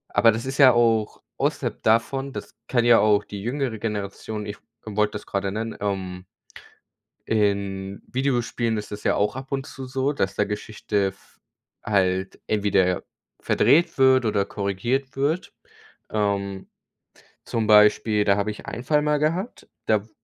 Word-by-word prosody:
aber 115 - +6
das 115 +3 -4
ist 135 +1 -4
ja 130 -2 +9
auch 115 -2 +1 0.2
außerhalb - - -2
davon, 135 +5 +1
das - - -8
kann 120 -2 +2
ja 120 -1 +7
auch 105 -1 +3
die 100 -1 -7
jüngere 125 0 -2
Generation 105 0 -4
ich 105 0 -5 0.3
wollte 105 0 0
das 105 - -6
gerade 100 -1 -2
nennen, 110 +1 -4
ähm 95 -2 -3 1.0
In 100 -2 -1
Videospielen 120 -3 0
ist 105 - -6
das 105 0 -7
ja - - +2
auch 105 - 0
ab 135 +1 -8
und 135 -1 -2
zu 135 - -8
so, 135 +2 -1
dass 95 -7 -1
da 105 - +2
Geschichte 105 -1 -2
f 95 0 -12 0.4
halt 95 -2 0
entweder 100 -4 +1 0.4
verdreht 170 +3 +3
wird 130 -2 +5
oder 100 -2 +1
korrigiert 120 +8 -2
wird. 150 +6 -1 0.6
Ähm, 100 -2 -2 0.8
zum 115 -2 -1
Beispiel, 105 0 +5
da 100 -1 +3
habe 105 +1 0
ich 105 - -10
einen 120 - -6
Fall 150 +1 +2
mal 150 0 +1
gehabt. 170 +9 -2 0.2
Da 105 -2 +2
w - - -24
110 Hz, 155 wpm, -24 LUFS, 100-130 Hz, 1.0 s, ja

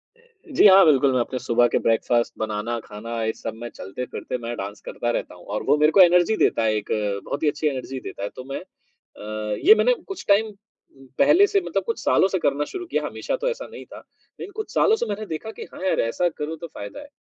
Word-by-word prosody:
जी, 460 - -1
हाँ, 195 0 +8
बिल्कुल, 140 -3 +4
मैं 130 - +2
अपने 125 +2 -2
सुबह 120 0 +3
के - - 0
ब्रेकफास्ट 115 +1 +1
बनाना, 110 +2 -2
खाना, 115 +2 -6
ये 110 0 0
सब - - -6
में 120 - -4
चलते-फिरते 125 +5 -6
मैं 120 0 -5
डांस 100 +1 -6
करता 120 - -3
रहता 115 - -4
हूँ, 90 - -16
और 105 +1 -4
वो - - +3
मेरे 150 +1 +4
को 195 - +6
एनर्जी 180 +3 +5
देता 115 - +2
है, 110 -1 +2
एक 105 -1 -3 0.4
बहुत 145 - -4
ही 150 - +4
अच्छी 150 +1 -1
एनर्जी 135 -1 -4
देता 100 - -8
है। 100 - -2
तो 130 - -8
मैं - - -3
अ, 110 - -8
ये 420 - +10
मैंने - - +3
कुछ 390 -2 -7
टाइम 205 +2 +4
उम, 200 -10 -19
पहले 300 +8 +6
से 400 -1 +1
मतलब - - -2
कुछ 460 - -3
सालों - - +4
से 190 - -1
करना 145 -2 0
शुरू 360 - -6
किया, - - -1
हमेशा - - -3
तो - - -1
ऐसा 485 - -5
नहीं - - -10
था। - - -12 0.4
लेकिन 395 - -7
कुछ 435 -1 -6
सालों 440 - +4
से 445 - -2
मैंने 210 +1 -3
देखा 180 +5 -5
कि, - - -9
"हाँ - - -10
यार, 190 - +1
ऐसा 115 +10 0
करूँ, 160 0 -5
तो 170 - -7
फ़ायदा 100 -9 -9
है।" 290 - -11
150 Hz, 240 wpm, -23 LUFS, -, 0.4 s, ये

